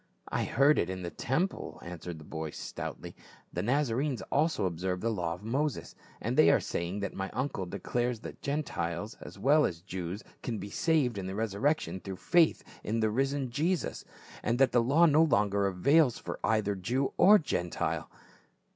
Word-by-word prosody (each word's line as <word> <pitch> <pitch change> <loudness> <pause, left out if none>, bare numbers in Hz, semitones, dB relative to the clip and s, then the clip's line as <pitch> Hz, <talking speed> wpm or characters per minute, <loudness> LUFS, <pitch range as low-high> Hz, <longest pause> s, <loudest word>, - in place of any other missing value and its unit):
" - - -44
I - - 0
heard 140 +5 +4
it 85 - 0
in 95 -1 -4
the 85 - -4
temple," 145 +10 -2
answered 90 -1 -7
the 80 - -11
boy 80 0 -5
stoutly. - - -7 0.2
" - - -27
The 90 - -1
Nazarenes 130 +3 0
also 160 -9 +2
observe 90 +1 -2
the 115 +4 0
law 85 -5 -2
of - - -15
Moses; 140 +7 -2 0.3
and - - -2
they - - +6
are - - +5
saying 90 +4 -3
that 100 - -3
my 95 0 -4
uncle 125 -7 -2
declares 120 +6 -2
that - - -9
Gentiles 110 - -3
as - - -10
well 145 +9 +4
as 85 - -1
Jews 95 +2 -5 0.2
can 115 -3 -3
be 100 +1 -7
saved 145 - +1
in 95 - -4
the 95 - -4
resurrection 110 +2 0
through 95 +1 -6
faith 170 - +3 0.2
in 115 +2 -1
the 110 -1 +2
risen 135 +1 0
Jesus, 165 +7 -1 0.4
and 115 +2 0
that 135 0 +4
the 120 - +4
law 145 +8 +5
no 155 -1 +5
longer 100 -8 +3
avails 125 - +3
for - - -6
either 110 -2 +2
Jew 120 +9 -1
or 210 +2 +8
Gentile." 90 - -2
115 Hz, 185 wpm, -30 LUFS, 95-140 Hz, 0.4 s, or